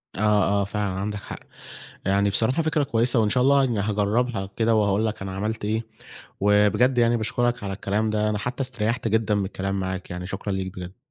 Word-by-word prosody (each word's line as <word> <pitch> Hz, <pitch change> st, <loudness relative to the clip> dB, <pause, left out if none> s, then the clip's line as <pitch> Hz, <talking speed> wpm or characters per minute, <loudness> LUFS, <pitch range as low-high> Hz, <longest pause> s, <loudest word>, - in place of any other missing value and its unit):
آه، 100 Hz, -, -4 dB, 0.4 s
آه -, -, 0 dB
فعلًا 100 Hz, 0 st, -2 dB
عندك 105 Hz, +1 st, -3 dB
حق. -, -, -8 dB, 0.7 s
يعني 100 Hz, +1 st, +2 dB
بصراحة 115 Hz, +10 st, +2 dB
فكرة 155 Hz, -1 st, +1 dB
كويسة 120 Hz, -2 st, +2 dB
وإن 105 Hz, -1 st, +2 dB
شاء 125 Hz, +3 st, +2 dB
الله 140 Hz, 0 st, +5 dB
يعني 120 Hz, -5 st, 0 dB
هاجربها 105 Hz, 0 st, 0 dB
كده 115 Hz, 0 st, +3 dB
وهاقول 105 Hz, 0 st, +2 dB
لك 110 Hz, -2 st, -3 dB
أنا 95 Hz, 0 st, -4 dB
عملت 105 Hz, +2 st, -3 dB
إيه، 110 Hz, +2 st, -1 dB, 0.6 s
وبجد 105 Hz, +5 st, +3 dB
يعني 120 Hz, 0 st, +4 dB
باشكرك 120 Hz, +1 st, -1 dB
على 95 Hz, -, -3 dB
الكلام 105 Hz, +3 st, -1 dB
ده 105 Hz, 0 st, 0 dB
أنا 105 Hz, -, -1 dB
حتى 125 Hz, +6 st, -4 dB
استريحت 115 Hz, -2 st, -2 dB
جدًا 105 Hz, -2 st, +1 dB
بالكلام 95 Hz, 0 st, -3 dB
معاك، 95 Hz, -1 st, -4 dB
يعني 90 Hz, 0 st, -5 dB
شكرًا 100 Hz, +1 st, -4 dB
ليك 95 Hz, -1 st, -3 dB
بجد. 90 Hz, +3 st, -8 dB
105 Hz, 195 wpm, -24 LUFS, 100-120 Hz, 0.7 s, الله